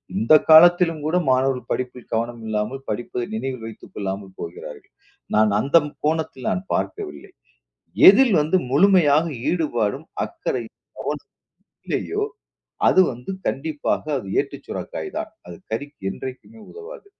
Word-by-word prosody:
இந்தக் 115 +10 +4
காலத்திலும் 165 -1 +6
கூட 160 +3 0 0.2
மாணவர்கள் 130 0 0
படிப்பில் 125 -1 -4
கவனம் 115 +1 -2
இல்லாமல் 110 +5 -3
படிப்பை 120 +2 -3
நினைவில் 125 0 -4
வைத்துக் 110 - -12
கொள்ளாமல் 95 -1 -5
போகிறார்கள். 85 +1 -9 0.4
நான் 110 0 +4
அந்த 140 +8 +4
ம் 150 - -8
கோணத்தில் 155 -5 -1
நான் 90 0 -1
பார்க்கவில்லை. 70 - -4 0.8
எதில் 230 +5 +6
வந்து 155 +5 +2
முழுமையாக 160 -1 +4 0.2
ஈடுபாடும், 140 -5 -1 0.2
அக்கறையும், 340 -2 -5 0.2
கவனமும் - - -5 0.5
இல்லையோ 415 +1 -1 0.6
அது - - +5
வந்து 125 +7 -8 0.2
கண்டிப்பாக 150 +2 -2
அது 110 - -9
ஏட்டுச் - - -8
சுரைக்காய்தான். - - -5 0.2
அது 90 -1 -9 0.2
கறிக்கு 145 +5 -5
என்றைக்குமே 130 - -9
உதவாது. 440 +1 -11
135 Hz, 120 wpm, -22 LUFS, 115-165 Hz, 0.8 s, காலத்திலும்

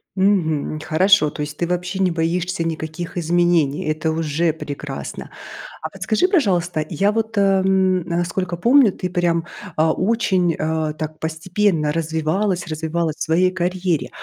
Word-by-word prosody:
Мгм. 170 -6 +1
Хорошо, 185 +1 +4
то 150 - -7
есть 150 0 -4
ты 175 - 0
вообще 180 +2 -2
не 185 -2 +2
боишься 170 +1 -1
никаких 165 +2 -5
изменений, 170 -3 +2
это 155 +1 -1
уже 160 +1 0
прекрасно. 145 -2 -7 0.5
А 160 - -3
подскажи, 195 - 0
пожалуйста, 180 - +1
я 195 +5 +1
вот, 225 0 -2
ам, 190 -1 +3
насколько 175 +1 -2
помню, 240 +4 +5
ты 180 - -4
прям, 170 -2 0 0.3
а, 160 0 +3
очень, 185 -5 +1
а, 155 -1 -1
так 155 0 -6
постепенно 160 0 0
развивалась 165 +4 -1
развивалась 160 0 -2
в - - -2
своей 180 +3 +2
карьере. 180 -2 -1
175 Hz, 140 wpm, -20 LUFS, 160-190 Hz, 0.5 s, помню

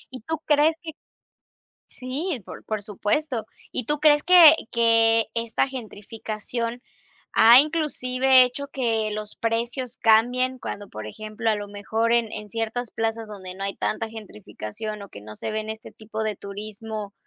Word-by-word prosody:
¿Y 255 - -8
tú 320 +6 -3
crees 300 +2 +4
que? 320 - -6 1.0
Sí, 270 +4 -4
por - - -10
por 215 -2 -4
supuesto. 220 +4 -1 0.3
¿Y 235 - -2
tú 295 0 +1
crees 295 -1 +5
que 345 -4 +9 0.2
que 230 -1 +4
esta 230 +2 0
gentrificación 230 -1 -5 0.5
ha 235 +3 +9
inclusive 265 -4 +3
hecho 250 +3 -3
que 225 -6 -1
los 210 0 -6
precios 235 +2 -3
cambien 245 +3 +3
cuando, 205 -4 -7
por 110 0 -8
ejemplo, 215 - -3
a - - +1
lo 205 0 -6
mejor 220 +3 -1
en 235 -2 +1
en 210 -1 -7
ciertas 225 +2 -3
plazas 225 0 -3
donde 190 -3 -7
no 195 +1 -7
hay 195 0 -2
tanta 225 +1 -2
gentrificación 210 - -8
o 200 - -12
que 100 - -11
no 105 0 -10
se - - -4
ven 215 0 -3
este 220 0 -7
tipo 220 0 -6
de 215 -2 -2
turismo, 210 +1 -7
225 Hz, 160 wpm, -24 LUFS, 215-255 Hz, 1.0 s, que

